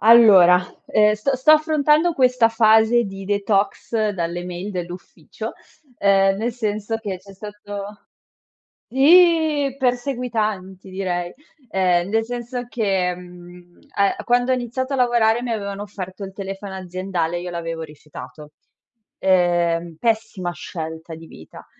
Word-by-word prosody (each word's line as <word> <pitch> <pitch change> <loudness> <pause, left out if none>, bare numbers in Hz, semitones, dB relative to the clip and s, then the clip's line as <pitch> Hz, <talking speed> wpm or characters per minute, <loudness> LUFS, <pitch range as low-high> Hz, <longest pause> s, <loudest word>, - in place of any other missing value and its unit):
Allora, 200 -6 +7 0.2
ehm, 210 0 +3
st-sto 260 +6 +1
affrontando 310 +1 +3
questa 250 -5 +3
fase 225 +1 +4
di 195 -1 -8
detox 205 +2 0
dalle 175 -2 -4
mail 180 +3 -6
dell'ufficio, 180 -1 -7 0.5
ehm, 195 -1 +3
nel 230 +4 -2
senso 215 -1 -3
che 200 -4 -5
c'è 195 +2 -15
stato 205 0 -9 0.8
sì! 310 0 +4
Perseguitanti 230 -7 -2
direi, 180 -2 -3 0.4
ehm, 180 -2 +1
nel 225 0 +1
senso 245 +1 -5
che, 195 -6 0
mhmm, 175 0 -14 0.2
uhm, 200 0 +1
quando 245 +1 +2
ho - - +4
iniziato 255 +2 -3
a - - 0
lavorare 240 -2 +2
mi 245 - -4
avevano 200 -2 -4
offerto 195 -1 -8
il 195 - -8
telefono 195 0 -7
aziendale 185 -2 -3
e - - -3
io 180 0 -6
l'avevo 165 -1 -5
rifiutato. 150 0 -11 0.7
Ehm, 175 -2 +1
pessima 220 -5 -1
scelta 160 +1 -7
di 165 +1 -12
vita. 80 - -14
200 Hz, 125 wpm, -21 LUFS, 180-235 Hz, 0.8 s, Allora